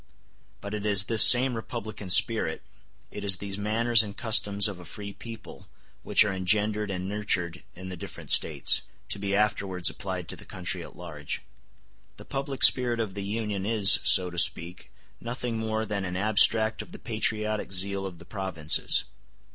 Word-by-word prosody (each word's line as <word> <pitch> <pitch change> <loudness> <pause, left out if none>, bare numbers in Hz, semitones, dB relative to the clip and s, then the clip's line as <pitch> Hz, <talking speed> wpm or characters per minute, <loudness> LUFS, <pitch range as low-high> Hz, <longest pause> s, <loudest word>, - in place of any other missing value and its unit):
But 100 +1 -8
it 105 -1 -4
is 100 -2 +3
this 115 +1 +4
same 125 +1 +6
republican 110 -3 -7
spirit, 100 -3 +3 0.5
it 105 - -8
is 95 -2 +4
these 100 0 -5
manners 115 +3 +2
and 105 -2 -8
customs 105 -4 +3
of 100 -4 -7
a - - -11
free 100 +5 -9
people, 115 0 -12 0.3
which - - +4
are 100 - -2
engendered 105 +3 0
and 95 -1 -5
nurtured 95 -4 -2
in 95 +1 -10
the 90 - -6
different 85 - -8
States, - - +3 0.3
to - - -1
be 100 0 -2
afterwards 100 -4 +1
applied 95 -3 -7
to - - -3
the - - -13
country - - -5
at - - -13
large. 75 -4 -7 0.7
The - - -12
public 135 -1 -3
spirit 120 -2 +6
of 110 -4 -3
the 100 - -6
Union 105 -1 -4
is, 105 -2 +3
so 90 -1 +3
to 85 - -4
speak, 85 +1 0 0.3
nothing 120 -1 -5
more 110 0 -3
than 105 -2 -4
an 90 -1 -5
abstract 110 +2 +2
of - - -13
the - - -9
patriotic 110 -2 -3
zeal 95 +1 0
of 90 -3 -11
the 85 - -15
provinces. 95 -7 0
100 Hz, 175 wpm, -26 LUFS, 95-110 Hz, 0.7 s, same